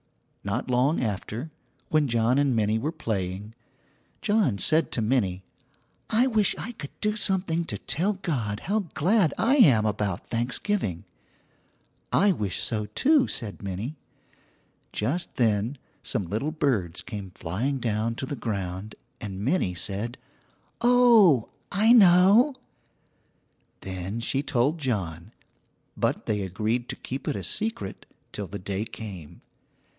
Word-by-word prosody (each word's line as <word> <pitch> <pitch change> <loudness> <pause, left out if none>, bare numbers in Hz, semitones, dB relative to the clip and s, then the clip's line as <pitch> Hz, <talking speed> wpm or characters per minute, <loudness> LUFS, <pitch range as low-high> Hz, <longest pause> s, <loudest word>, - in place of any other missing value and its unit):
Not 115 +6 -2
long 125 +5 +2
after, 110 - -4 0.4
when 155 -2 +3
John 120 +2 +2
and 140 -3 +2
Minnie 110 0 +1
were 150 +7 -2
playing, 105 - -4 0.7
John 205 - +2
said 160 +10 +2
to 115 - 0
Minnie, 100 -6 0 0.7
"I 230 +4 +4
wish 220 -5 +2
I 230 - -5
could 145 -11 -8
do 210 0 +1
something 185 -5 +1
to - - -4
tell 195 +6 0
God 130 - -3
how 205 +2 -1
glad 180 +1 +3
I 260 +6 +3
am 125 - +6
about 105 -4 -1
Thanksgiving." 120 - -1 1.1
"I 200 0 +4
wish 105 - -2
so, 105 -3 -1
too," 275 - +3
said 110 -5 -4
Minnie. 100 +9 -4 1.0
Just 145 +12 -2
then 115 +2 +1 0.2
some 105 -7 -1
little 110 - -2
birds 115 - -1
came 100 -4 -6
flying 115 +12 -2
down 115 -1 -1
to 130 - -4
the 140 - -4
ground, 100 -3 -4 0.3
and 100 -1 -5
Minnie 130 - +1
said: 105 - -3 0.6
"Oh, 235 - +6 0.2
I 215 +4 +5
know." 205 +6 +6 1.3
Then 95 +3 -4
she 135 +4 -1
told 140 +3 +1
John, 90 - -3 0.6
but - - -1
they 105 -2 0
agreed 110 +6 -2
to - - -3
keep 135 +2 -6
it - - 0
a 100 - -4
secret 210 - -3 0.2
till 100 -2 -5
the 100 - -6
day 100 +1 -3
came. 100 -9 -9
120 Hz, 135 wpm, -26 LUFS, 105-170 Hz, 1.3 s, am